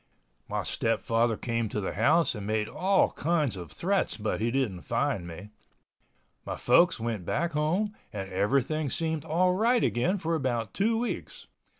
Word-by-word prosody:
My - - -1
stepfather 115 0 +1
came 115 -2 -2
to 105 - -2
the 95 - -3
house 150 - +3
and 105 -3 -6
made 110 0 0
all 190 - +2
kinds 155 -7 0
of 90 -3 -8
threats 190 - 0
but 110 0 -2
he 115 - +1
didn't 115 -8 -1
find 85 - -1
me. 90 +5 -9 0.9
My - - -4
folks 165 +7 +4
went 110 -4 -3
back 170 - -1
home 175 +8 0 0.2
and 100 -3 -5
everything 140 +10 +1
seemed 160 +1 -1
all 180 +3 +2
right 230 +5 +3
again 175 +12 +1
for 165 -2 -2
about 120 -8 -1
two 225 +3 +1
weeks. 240 +1 -4
135 Hz, 165 wpm, -28 LUFS, 110-170 Hz, 0.9 s, folks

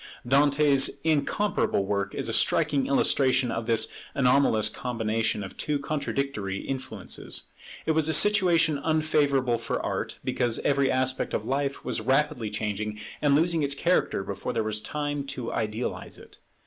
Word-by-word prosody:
Dante's 140 +1 +3
incomparable 155 - 0
work 100 0 -2
is - - -1
a - - -1
striking 140 -2 +2
illustration 130 -2 +2
of 115 0 -4
this 115 -2 +3 0.3
anomalous 125 -5 +3
combination 110 -2 -1
of 95 - -9
two 150 -1 0
contradictory 140 -9 -3
influences. 130 -8 -4 0.4
It - - +1
was 160 0 +2
a - - +1
situation 175 -7 +4
unfavourable 145 -6 +1
for - - -3
art, - - -4
because 120 -2 0
every 140 -1 +2
aspect 130 0 -1
of - - -3
life 140 +1 -2
was - - -2
rapidly 135 -1 0
changing 105 0 -4 0.2
and 145 -2 +3
losing 165 +1 +2
its 140 -1 +1
character 170 - +1
before 100 0 -5
there - - 0
was 110 0 -1
time 145 +2 -3
to 125 -4 -5
idealize 110 +2 -4
it. - - -16
135 Hz, 150 wpm, -26 LUFS, 110-145 Hz, 0.4 s, situation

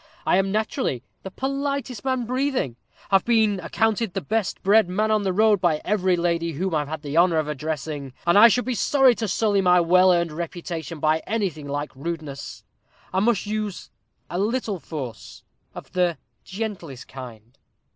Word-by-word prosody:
I - - +3
am 195 0 +1
naturally 215 - -1 0.2
the 190 - -7
politest 275 +1 -3
man 260 -2 0
breathing 255 - -1 0.4
have 195 -1 +5
been 220 -4 +2
accounted 220 +2 0
the - - +1
best 210 +6 -2
bred 205 0 +4
man 215 +4 0
on 215 -1 +3
the 195 -2 0
road 210 0 +3
by 160 -4 +2
every 190 -3 +2
lady 170 -1 0
whom 185 +5 -2
I 155 - +2
have 145 - -3
had 160 0 -5
the 145 +2 -3
honor 170 -1 +4
of 155 -1 0
addressing; 150 -1 -4
and 170 - +3
I 215 +3 +9
should 245 +2 +1
be 255 - -1
sorry 265 +1 +4
to 225 -1 -3
sully 205 0 +1
my 180 -1 +5
well 180 +2 +5
earned 170 -2 +1
reputation 165 -1 -5
by 155 +1 +2
anything 190 -10 -2
like 145 0 -4
rudeness. 150 -1 -6 0.5
I 190 - +2
must 220 0 +1
use 210 -2 -4 0.4
a 175 - -3
little 215 -2 -1
force, 135 -9 -8 0.3
of - - -10
the 180 -3 +1 0.3
gentlest 185 - -6
kind. 120 -3 -11
185 Hz, 175 wpm, -24 LUFS, 160-220 Hz, 0.5 s, I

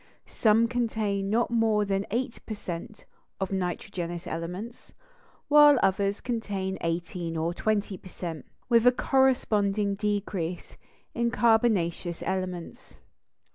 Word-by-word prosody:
Some 225 +1 +3
contain 220 -5 -1
not 230 +2 +1
more 220 -3 +2
than 195 0 -1
eight 240 +3 -2
per 215 - -4
cent 180 +1 -7 0.3
of 190 0 -2
nitrogenous 180 -1 -3
elements, 180 +8 -6 0.5
while 295 -1 +7
others 195 +1 +1
contain 200 -6 -3
eighteen 170 0 -3
or 165 +2 -1
twenty 205 -1 -1
per 185 - -13
cent, 165 -4 -6 0.2
with 235 -1 +4
a - - +9
corresponding 210 -7 +2
decrease 200 -4 -3 0.4
in 235 0 +1
carbonaceous 220 -8 +1
elements. 185 -2 -5
200 Hz, 115 wpm, -27 LUFS, 180-230 Hz, 0.5 s, a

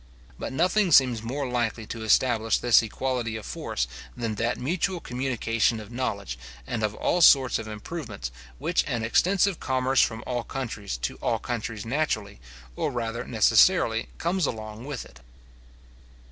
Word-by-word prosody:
But - - -4
nothing 180 +6 +2
seems 125 -6 +5
more 130 +5 -3
likely 120 -2 -1
to 115 +1 -6
establish 115 0 +3
this 120 -1 +5
equality 120 0 -2
of 110 - -6
force, - - -2 0.3
than 115 -2 -2
that 115 +3 -1
mutual 175 +6 -1
communication 120 -4 0
of 105 +1 -10
knowledge, 100 - -3 0.3
and 115 - -3
of 105 0 -1
all 180 - +1
sorts 135 -5 +6
of 110 - -6
improvements, 105 - -6 0.3
which - - +1
an 115 - -1
extensive 185 +9 +2
commerce 130 0 +2
from 110 0 0
all 120 -2 -2
countries 110 - -4
to - - -2
all - - 0
countries 115 -3 -4
naturally, 115 - -1 0.4
or - - -1
rather 115 -1 -3
necessarily, 110 - +4
carries 175 -2 0
along 110 +1 -6
with 145 -3 -5
it. - - -16
120 Hz, 150 wpm, -26 LUFS, 110-135 Hz, 0.4 s, sorts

